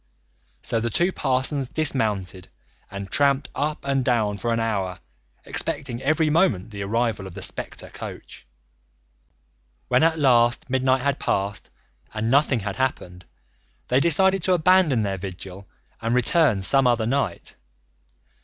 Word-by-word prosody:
So 115 - 0
the 115 +1 -2
two 175 - +1
parsons 135 -2 -1
dismounted 110 - -1 0.4
and 100 0 -8
tramped 140 0 +1
up 150 +2 -3
and 135 -1 0
down 110 -5 0
for 115 +4 -2
an 115 - 0
hour, 100 -5 -2 0.5
expecting 125 -3 0
every 155 +3 +1
moment 115 - +1
the 100 -1 -7
arrival 105 -1 -1
of 95 - -12
the - - -6
spectre - - -3
coach. - - -10 1.4
When - - +3
at 160 0 +3
last 125 -3 +2
midnight 130 0 +1
had 140 -1 0
passed 100 +1 -2 0.5
and 110 +2 -1
nothing 135 -3 +2
had 100 0 -5
happened, 90 -9 -3 0.6
they 125 - +3
decided 190 +5 +4
to 185 - +3
abandon 175 -8 +3
their 95 -2 -3
vigil 95 +1 -9 0.3
and 115 +2 0
return 125 - +3
some 135 +6 +4
other 120 -2 +1
night. 120 -6 -2
125 Hz, 140 wpm, -23 LUFS, 100-140 Hz, 1.4 s, decided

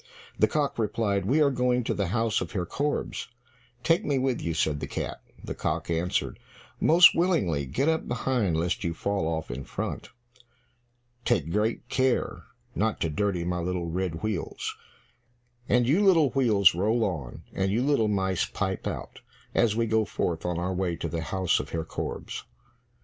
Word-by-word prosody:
The - - +5
cock 145 -5 -1
replied, 100 -3 0
"We 150 +6 +4
are 140 - +3
going 125 -1 +1
to - - -1
the 100 -2 -1
house 110 +2 +1
of - - -5
Herr 90 -4 -1
Korbes." 145 - -2 0.6
"Take 165 +4 +3
me 140 -2 +1
with 130 -1 0
you," 85 -1 -2
said 75 -2 +1
the - - -4
cat. - - -4 0.2
The - - -4
cock - - -2
answered, 85 +2 -1 0.4
"Most 170 +2 +7
willingly, 95 - +1
get 105 - 0
up 160 0 +1
behind, 120 -8 0
lest 85 +2 -1
you 85 -1 -2
fall 100 -2 -1
off 80 -5 -3
in 65 +3 -5
front. - - -5 1.1
Take 85 - +1
great 110 +5 0
care 130 0 0 0.3
not 110 +1 0
to 80 - 0
dirty 90 +1 0
my 90 0 -1
little 90 0 -2
red 90 -1 -2
wheels. 110 -5 -3 0.9
And 120 -1 +3
you 170 +10 +3
little 165 -9 +5
wheels, 110 -8 +5
roll 110 +7 +1
on, 80 - -4
and 95 0 0
you 115 +5 +1
little 140 -6 +2
mice 95 -3 0
pipe 95 -2 -3
out, - - -6 0.3
as 110 -3 +3
we 115 0 +1
go 110 0 +2
forth 85 -5 -2
on 90 -1 -1
our 90 +2 -1
way 90 -2 -1
to 85 0 -4
the 80 +1 -3
house 90 +3 +1
of - - -5
Herr 80 -1 -3
Korbes." - - -5
100 Hz, 175 wpm, -27 LUFS, 85-125 Hz, 1.1 s, Most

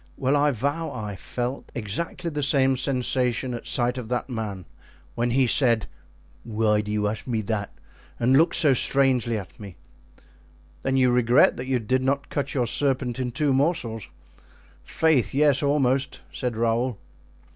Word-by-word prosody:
Well, 135 +1 +1
I 145 +1 +3
vow 145 +6 -2
I 105 -2 -5
felt 125 +7 -5
exactly 165 - -3
the 150 -1 -3
same 135 -2 +3
sensation 125 -1 0
at 120 - -6
sight 125 +1 +1
of 115 -3 -8
that 125 +1 -2
man 105 -6 -5 0.5
when 120 +1 -1
he 130 +2 +3
said, 115 -3 +3 0.6
'Why 105 -1 +1
do 105 0 -6
you 105 -1 0
ask 105 +4 -5
me 115 -3 -1
that?' 100 -1 -3 0.5
and 125 +3 +3
looked 165 +4 +4
so 145 -4 +4
strangely 130 -3 +2
at 95 -4 -9
me." 100 -4 -10 1.1
"Then 135 +6 0
you 130 -1 +4
regret 125 +2 +4
that 125 - -6
you 130 -1 +1
did 130 +3 0
not 140 +2 -1
cut 145 - -3
your 125 -3 +1
serpent 130 0 -1
in 125 -1 -2
two 140 +3 0
morsels?" 130 - -1 0.8
"Faith, 155 -7 +1
yes, 145 -1 +3
almost," 140 -2 0
said 125 -4 -3
Raoul. 115 +1 0
125 Hz, 160 wpm, -24 LUFS, 115-135 Hz, 1.1 s, looked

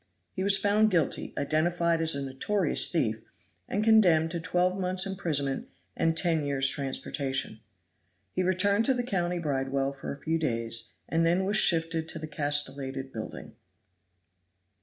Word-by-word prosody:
He 190 - -3
was 200 0 +3
found 210 +1 +3
guilty, 170 -7 +1
identified 165 +3 +1
as 160 -2 +4
a 140 -1 -3
notorious 150 +7 +1
thief, 115 -10 -1 0.5
and 205 - -1
condemned 180 -8 +4
to 170 - -3
twelve 180 +2 0
months' 185 +1 0
imprisonment 155 -8 -2 0.3
and 165 0 0
ten 165 -3 +2
years' 140 -1 +1
transportation. 135 -3 -3 0.7
He 185 - -1
returned 200 +4 +2
to 265 - +3
the 245 - -1
county 180 -6 -1
bridewell 135 -3 -1
for 140 - -7
a 140 - -8
few 165 +1 -1
days, 115 -5 -1
and 165 0 +1
then 175 +3 +2
was 205 +2 +2
shifted 165 -3 +2
to - - -5
the 155 - -6
castellated 140 -3 -3
building. 110 -1 -7
165 Hz, 150 wpm, -28 LUFS, 140-185 Hz, 0.7 s, as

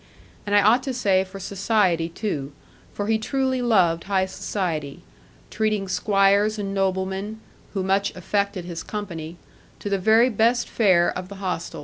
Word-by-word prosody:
And 205 - +1
I 205 - +6
ought 230 +5 +5
to 265 -2 -3
say 195 -6 +2
for 190 +1 -10
society 190 -4 +1
too, 150 -7 -4 0.4
for 205 - -4
he 220 +1 +1
truly 260 +2 -1
loved 180 -8 +2
high 190 -1 +1
society, 165 -7 -4 0.5
treating 215 -2 0
squires 200 +2 +2
and 195 -1 -3
noblemen 195 +2 -2 0.4
(who 190 - 0
much 195 +1 0
affected 200 0 -2
his 170 -1 -5
company) 175 -6 -6 0.4
to 205 - -6
the 195 - +1
very 225 +6 +4
best 235 +3 +2
fare 185 -6 +3
of 185 0 -6
the 200 - -8
hostel. 180 -4 -4
195 Hz, 155 wpm, -23 LUFS, 185-215 Hz, 0.5 s, I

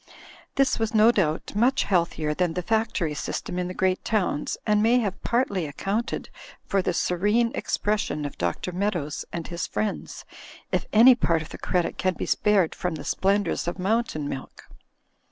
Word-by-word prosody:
This 275 -3 +2
was 225 0 -1
no 220 +2 +7
doubt 165 -9 -1
much 250 +6 +3
healthier 170 -5 0
than 170 0 0
the 180 - -2
factory 220 -7 0
system 175 +4 -4
in 180 - -1
the 180 - -5
great 185 0 +1
towns 195 -9 -1
and 210 -1 +3
may 230 +3 +4
have 205 -6 -1
partly 200 - 0
accoimted 200 +10 -2 0.4
for 195 - +1
the 185 - 0
serene 210 +7 +1
expression 205 -8 -1
of 145 - -5
Dr. 85 - -2
Meadows 175 -6 -2
and 170 -1 -4
his 170 -1 -4
friends, 215 -1 -3 0.5
if - - 0
any 235 +4 +8
part 170 -9 +1
of - - -12
the - - -9
credit 175 -3 -1
can 185 -1 +1
be - - -3
spared 200 -6 +2
from 180 -2 -3
the 145 - -7
splendours 195 +1 0
of 175 - -2
Mountain 195 -6 0
Milk. 135 -2 -7
190 Hz, 170 wpm, -25 LUFS, 170-215 Hz, 0.5 s, any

